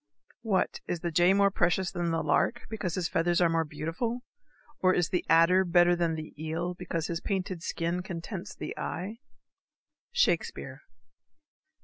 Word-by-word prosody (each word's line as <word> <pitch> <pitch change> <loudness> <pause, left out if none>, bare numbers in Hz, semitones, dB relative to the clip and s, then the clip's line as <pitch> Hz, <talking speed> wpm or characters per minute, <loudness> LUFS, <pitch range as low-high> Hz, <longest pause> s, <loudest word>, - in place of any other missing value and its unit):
_ - - -25
What! 210 -5 0
is 175 -2 -2
the 170 - -2
jay 175 +3 +5
more 200 0 +4
precious 175 0 +1
than 175 -1 -1
the 165 0 0
lark, 155 +10 +1
Because 195 -6 -3
his 180 -3 0
feathers 170 +1 +1
are 175 -2 +4
more 165 0 +2
beautiful? 165 +11 -3 0.6
Or 185 0 +4
is 175 -2 +1
the 180 - 0
adder 165 +4 +6
better 175 0 +4
than 170 -2 0
the 155 0 -7
eel, 165 +3 -2
Because 165 -2 -3
his 170 -1 -3
painted 185 -3 -2
skin 170 +1 -2
contents 185 +2 -6
the - - -6
eye? 210 +6 -4 0.9
_Shakespeare. 485 0 0
175 Hz, 160 wpm, -29 LUFS, 165-190 Hz, 0.9 s, adder